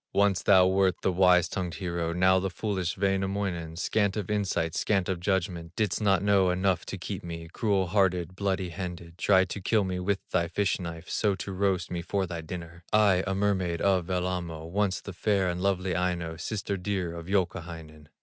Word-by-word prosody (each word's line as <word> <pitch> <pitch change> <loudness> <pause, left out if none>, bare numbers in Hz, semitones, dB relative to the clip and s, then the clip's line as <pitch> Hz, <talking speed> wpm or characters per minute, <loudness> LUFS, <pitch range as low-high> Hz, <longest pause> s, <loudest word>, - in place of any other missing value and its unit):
"Once 100 -3 +3
thou 95 +1 +6
wert 95 -1 +3
the - - +2
wise 90 -1 +5
tongued 90 0 -3
hero, 85 -3 -2
Now 95 +2 +4
the 95 +1 -2
foolish 95 -3 -2
Wainamoinen, 95 -3 -1
Scant 100 +3 0
of 105 -1 -3
insight, 95 -6 0
scant 95 -4 +1
of 95 -2 -1
judgment, 90 -2 -1
Didst 105 -1 0
not 100 -3 +3
know 100 -2 +4
enough 90 0 0
to - - -4
keep - - -5
me, 85 -1 -6
Cruel 100 -4 +1
hearted, 90 -2 +1
bloody 95 -2 -1
handed, 85 -1 -7
Tried 95 0 +4
to 100 - -5
kill 105 +3 +2
me 90 -1 -2
with 95 +2 -2
thy 85 -2 +1
fish 100 +4 0
knife, 85 -1 -7
So 105 -3 +1
to 95 +1 -6
roast 95 -2 0
me 85 -1 -2
for 95 +2 -1
thy 85 -2 -5
dinner; 85 +1 -8
I, 100 -4 +4
a 95 - 0
mermaid 95 -4 0
of 95 -3 +2
Wellamo, 90 -3 -2
Once 100 -1 0
the 100 - -8
fair 95 +1 +1
and 90 0 -2
lovely 95 -1 0
Aino, 85 -2 -1
Sister 100 +3 -3
dear 95 -2 -2
of 85 0 -8
Youkahainen." 85 -5 -3
95 Hz, 190 wpm, -28 LUFS, 85-100 Hz, -, thou